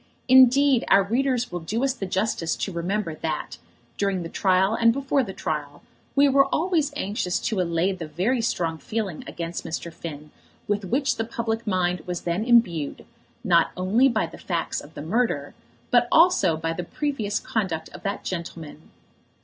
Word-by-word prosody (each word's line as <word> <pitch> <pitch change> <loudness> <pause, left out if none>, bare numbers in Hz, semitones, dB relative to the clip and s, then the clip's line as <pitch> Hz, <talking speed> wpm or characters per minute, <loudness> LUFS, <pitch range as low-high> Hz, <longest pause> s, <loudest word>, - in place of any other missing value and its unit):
Indeed 260 0 +6
our 195 0 +5
readers 245 +3 0
will 175 - -3
do 215 +10 -2
us 270 -1 +2
the 205 -7 -5
justice 185 -3 -1
to 195 - -3
remember 175 +1 -2
that, 155 0 -4 0.4
during 195 -3 0
the 165 - -6
trial 190 +3 +2
and 230 0 +4
before 275 +2 +1
the 215 -7 -4
trial, 145 -5 -4 0.3
we 285 0 +6
were 275 0 +4
always 315 -1 +1
anxious 195 -7 -1
to 215 -5 0
allay 170 +2 +1
the 175 -4 -6
very 195 - 0
strong 165 -8 -1
feeling 210 -6 -4
against 170 0 -5
Mr. 165 +1 -5
Finn 150 -3 -8 0.4
with 205 -1 -1
which 265 +8 0
the 225 - 0
public 230 0 -3
mind 180 -3 0
was 175 -1 -3
then 175 +4 -1
imbued, 205 - +2 0.4
not - - +4
only 215 +9 +3
by 220 -6 0
the 165 - -11
facts 170 -3 -2
of 145 - -15
the 145 - -6
murder, 165 -6 -1 0.4
but 245 -1 +4
also 320 - +5
by 165 +1 -2
the 180 - -4
previous 220 - -2
conduct 190 -10 -2
of - - -11
that 200 -1 -3
gentleman. 165 -3 -7
195 Hz, 175 wpm, -24 LUFS, 170-240 Hz, 0.4 s, Indeed